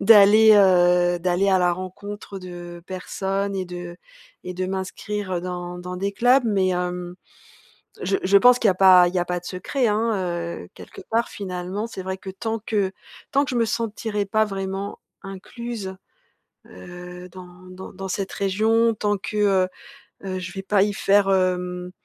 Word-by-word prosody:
d'aller, 215 Hz, +1 st, +7 dB
heu, 180 Hz, -2 st, +4 dB
d'aller 185 Hz, +2 st, +1 dB
à 190 Hz, -, +4 dB
la 175 Hz, -1 st, +3 dB
rencontre, 195 Hz, +3 st, -7 dB
heu, -, -, -14 dB
de 175 Hz, -1 st, -9 dB
personnes 195 Hz, +2 st, -3 dB
et 190 Hz, -1 st, -2 dB
de 175 Hz, -1 st, -8 dB, 0.5 s
et 180 Hz, 0 st, -5 dB
de 185 Hz, 0 st, -2 dB
m'inscrire 190 Hz, 0 st, -4 dB
dans 180 Hz, 0 st, -5 dB
dans 180 Hz, +1 st, -6 dB
des 200 Hz, +2 st, -1 dB
clubs, 250 Hz, +5 st, +4 dB
mais, 195 Hz, -4 st, +2 dB
hem, 180 Hz, 0 st, -3 dB, 0.9 s
je 195 Hz, +2 st, +1 dB
je 200 Hz, +2 st, +5 dB
pense 250 Hz, +3 st, +6 dB
qu'il 225 Hz, -, +2 dB
y -, -, +6 dB
a -, -, -1 dB
pas 185 Hz, -2 st, +7 dB
il 180 Hz, -, -5 dB
y -, -, +3 dB
a 175 Hz, -, 0 dB
pas 180 Hz, 0 st, -2 dB
de 180 Hz, -, -18 dB
secret, 230 Hz, +7 st, -1 dB
hein, 220 Hz, +2 st, +1 dB, 0.5 s
heu, -, -, -12 dB
quelque 395 Hz, -, -11 dB
part, 230 Hz, +1 st, +1 dB
finalement. 190 Hz, +2 st, -5 dB
C'est 190 Hz, -5 st, -7 dB
vrai 190 Hz, 0 st, -4 dB
que 190 Hz, -, -8 dB
tant 220 Hz, +4 st, -3 dB
que 200 Hz, -4 st, 0 dB, 0.4 s
tant 280 Hz, +1 st, +3 dB
que -, -, -7 dB
je -, -, -3 dB
me 230 Hz, -1 st, +2 dB
sentirai 220 Hz, -2 st, -2 dB
pas 215 Hz, +2 st, +2 dB
vraiment 195 Hz, 0 st, -4 dB, 0.2 s
incluse, 195 Hz, +1 st, -7 dB, 0.7 s
heu, 180 Hz, 0 st, -10 dB
dans 185 Hz, 0 st, -11 dB, 0.2 s
dans 185 Hz, +1 st, -10 dB
dans 195 Hz, 0 st, -7 dB
cette 190 Hz, +1 st, -3 dB
région, 220 Hz, +4 st, +2 dB
tant 205 Hz, -1 st, -1 dB
que, 210 Hz, -, -6 dB
heu, 195 Hz, -3 st, +3 dB, 0.6 s
heu, 185 Hz, -1 st, -3 dB
je 185 Hz, -1 st, -6 dB
vais 195 Hz, -, -5 dB
pas 195 Hz, 0 st, +3 dB
y 205 Hz, 0 st, -1 dB
faire, 195 Hz, 0 st, +3 dB
hem, 180 Hz, -1 st, -1 dB
190 Hz, 180 wpm, -23 LUFS, 180-210 Hz, 0.9 s, d'aller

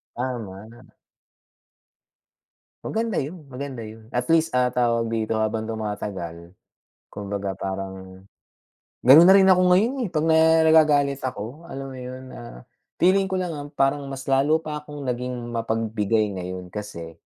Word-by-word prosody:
Tama 115 Hz, -5 st, -5 dB
nama 120 Hz, +2 st, -17 dB, 1.9 s
Maganda 225 Hz, -2 st, -1 dB
yun, 155 Hz, +3 st, -7 dB
maganda 135 Hz, -3 st, -7 dB
yun, 110 Hz, +1 st, -12 dB
at 125 Hz, +1 st, -2 dB
least, 165 Hz, +2 st, +3 dB
ah, 125 Hz, -1 st, +2 dB
tawag 115 Hz, -2 st, +1 dB
dito, 115 Hz, -1 st, -1 dB
habang 110 Hz, 0 st, -1 dB
tumatagal 100 Hz, -6 st, -5 dB, 0.6 s
kumbaga 100 Hz, -1 st, -4 dB
parang 95 Hz, -1 st, -6 dB, 0.8 s
ganun 135 Hz, +7 st, +9 dB
na 185 Hz, -, +8 dB
rin 195 Hz, -1 st, +6 dB
ako 185 Hz, -1 st, +5 dB
ngayon 215 Hz, +8 st, +3 dB
eh, -, -, -4 dB
'pag 155 Hz, 0 st, +1 dB
na 160 Hz, 0 st, +5 dB, 0.3 s
nagagalit 145 Hz, -3 st, +4 dB
ako, 125 Hz, +4 st, -5 dB
alam 135 Hz, 0 st, -6 dB
mo 130 Hz, -, -9 dB
yun, 130 Hz, +1 st, -8 dB
ah, 120 Hz, -, -11 dB, 0.3 s
feeling 190 Hz, +2 st, +3 dB
ko 190 Hz, -, 0 dB
lang, 175 Hz, -3 st, -3 dB
ah, 145 Hz, -, -6 dB
parang 140 Hz, 0 st, +1 dB
mas 135 Hz, -1 st, -7 dB
lalo 140 Hz, +4 st, +3 dB
pa 150 Hz, -2 st, -6 dB
akong 150 Hz, -1 st, -9 dB
naging 125 Hz, -1 st, -4 dB
mapagbigay 110 Hz, -2 st, 0 dB
ngayon 90 Hz, 0 st, -6 dB
kasi 90 Hz, -4 st, -8 dB
125 Hz, 145 wpm, -24 LUFS, 105-145 Hz, 1.9 s, ganun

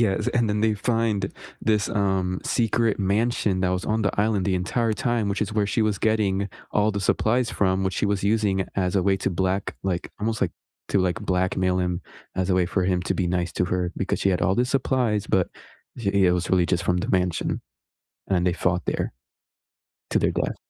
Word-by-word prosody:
Yes, 100 Hz, -5 st, +1 dB
and 120 Hz, -3 st, +1 dB
then 105 Hz, 0 st, 0 dB
they 110 Hz, 0 st, +2 dB
find 110 Hz, -2 st, 0 dB, 0.3 s
this, 105 Hz, -2 st, +1 dB
um, 95 Hz, -4 st, 0 dB
secret 115 Hz, -2 st, +1 dB
mansion 100 Hz, -1 st, +1 dB
that 95 Hz, -, +2 dB
was 90 Hz, 0 st, -1 dB
on 110 Hz, +1 st, 0 dB
the 100 Hz, 0 st, 0 dB
island 105 Hz, -3 st, +1 dB
the 95 Hz, -2 st, +1 dB
entire 110 Hz, +5 st, 0 dB
time, 115 Hz, -1 st, 0 dB
which 100 Hz, +1 st, 0 dB
is 105 Hz, -, -3 dB
where 105 Hz, -1 st, +1 dB
she 110 Hz, +3 st, +1 dB
was 105 Hz, -2 st, 0 dB
getting 100 Hz, -3 st, +1 dB, 0.2 s
all 105 Hz, 0 st, +2 dB
the 100 Hz, -1 st, -3 dB
supplies 115 Hz, +5 st, +1 dB
from, 95 Hz, -1 st, +1 dB
which 95 Hz, -, -1 dB
she -, -, 0 dB
was 100 Hz, -1 st, 0 dB
using 100 Hz, -3 st, +1 dB
as 90 Hz, 0 st, +1 dB
a 95 Hz, -, +3 dB
way 95 Hz, +1 st, +3 dB
to 95 Hz, -, -1 dB
black 95 Hz, +2 st, -1 dB
like, 90 Hz, -2 st, -2 dB
almost, 110 Hz, 0 st, -1 dB
like, 90 Hz, -3 st, +1 dB, 0.4 s
to, 100 Hz, -, +2 dB
like, 95 Hz, +3 st, 0 dB
blackmail 95 Hz, -1 st, +1 dB
him 90 Hz, -1 st, -1 dB, 0.4 s
as 95 Hz, 0 st, 0 dB
a 90 Hz, -, +3 dB
way 90 Hz, -1 st, +2 dB
for 95 Hz, 0 st, 0 dB
him 90 Hz, -1 st, +1 dB
to -, -, -1 dB
be 90 Hz, -, 0 dB
nice 90 Hz, 0 st, -1 dB
to -, -, 0 dB
her, 90 Hz, -1 st, -1 dB
because 95 Hz, -, -1 dB
she -, -, +2 dB
had 90 Hz, -, 0 dB
all 95 Hz, +2 st, +3 dB
the 120 Hz, -, +2 dB
supplies, 125 Hz, -5 st, 0 dB
but 95 Hz, -3 st, +2 dB, 0.5 s
i 110 Hz, -, -2 dB
it 100 Hz, -2 st, +4 dB
was 90 Hz, 0 st, -1 dB
really 90 Hz, -2 st, +4 dB
just 90 Hz, -1 st, 0 dB
from 90 Hz, +1 st, +2 dB
the -, -, -3 dB
mansion, 90 Hz, -2 st, 0 dB, 0.7 s
and 90 Hz, -2 st, +2 dB
they 90 Hz, -, +2 dB
fought 90 Hz, -1 st, 0 dB
there -, -, -2 dB, 1.0 s
to -, -, +2 dB
their -, -, +2 dB
death. -, -, -1 dB
95 Hz, 215 wpm, -24 LUFS, 90-110 Hz, 1.0 s, it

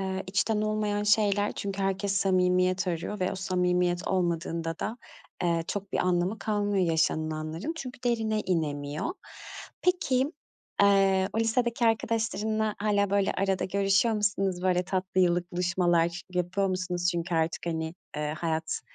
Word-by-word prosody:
Eee, 190 Hz, 0 st, -2 dB
içten 200 Hz, +3 st, +1 dB
olmayan 215 Hz, -1 st, 0 dB
şeyler. 205 Hz, -1 st, +3 dB
Çünkü 200 Hz, -1 st, -4 dB
herkes 195 Hz, +1 st, 0 dB
samimiyet 185 Hz, -1 st, +2 dB
arıyor 180 Hz, +4 st, -3 dB
ve 185 Hz, -, 0 dB
o -, -, -4 dB
samimiyet 180 Hz, -1 st, 0 dB
olmadığında 170 Hz, -2 st, -1 dB
da, 230 Hz, +3 st, -4 dB, 0.4 s
eee, 170 Hz, -1 st, +1 dB
çok 200 Hz, -2 st, -4 dB
bir -, -, 0 dB
anlamı 180 Hz, +3 st, +1 dB
kalmıyor 205 Hz, -3 st, 0 dB
yaşanılanların. 155 Hz, -, -1 dB
Çünkü 255 Hz, -5 st, -7 dB
derine 220 Hz, -3 st, +1 dB
inemiyor. 150 Hz, -, -2 dB, 0.7 s
Peki, 295 Hz, -6 st, +1 dB, 0.5 s
eee, 195 Hz, -1 st, +4 dB
o -, -, -1 dB
lisedeki 235 Hz, +1 st, +1 dB
arkadaşlarınla 220 Hz, -1 st, 0 dB
hâlâ, 205 Hz, -1 st, +1 dB
böyle, 200 Hz, -1 st, +2 dB
arada 195 Hz, -1 st, 0 dB
görüşüyor 195 Hz, +4 st, +2 dB
musunuz? 195 Hz, -3 st, 0 dB
Böyle, 180 Hz, -1 st, +2 dB
tatlı 185 Hz, 0 st, -1 dB
yıllık 175 Hz, -1 st, +1 dB
buluşmalar 175 Hz, -1 st, +1 dB
yapıyor 185 Hz, +2 st, 0 dB
musunuz? 180 Hz, -1 st, -1 dB
Çünkü 170 Hz, +1 st, -2 dB
artık, 160 Hz, +1 st, 0 dB
hani, 160 Hz, -1 st, -2 dB, 0.2 s
eee, 150 Hz, 0 st, -2 dB
hayat 160 Hz, -1 st, -2 dB
190 Hz, 135 wpm, -28 LUFS, 175-205 Hz, 0.7 s, eee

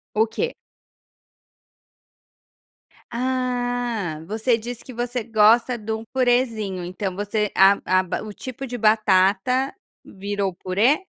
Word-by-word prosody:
O 220 Hz, +1 st, +3 dB
quê? 465 Hz, -, -2 dB, 2.6 s
Ah! 245 Hz, -7 st, -2 dB
Você 225 Hz, +3 st, +1 dB
disse 235 Hz, +1 st, -7 dB
que 255 Hz, -, -10 dB
você 240 Hz, 0 st, -3 dB
gosta 230 Hz, +2 st, +4 dB
de 220 Hz, 0 st, -6 dB
um 220 Hz, 0 st, -3 dB
purêzinho, 235 Hz, -7 st, +1 dB
então 185 Hz, +1 st, -4 dB
você 205 Hz, +1 st, -1 dB
a 195 Hz, +1 st, +7 dB
a 185 Hz, +1 st, +1 dB
o 215 Hz, -, -8 dB
tipo 255 Hz, +4 st, -7 dB
de 245 Hz, -1 st, -5 dB
batata 215 Hz, -, +3 dB, 0.3 s
virou 200 Hz, -1 st, -3 dB
purê? 220 Hz, -, +1 dB
220 Hz, 115 wpm, -23 LUFS, 200-245 Hz, 2.6 s, a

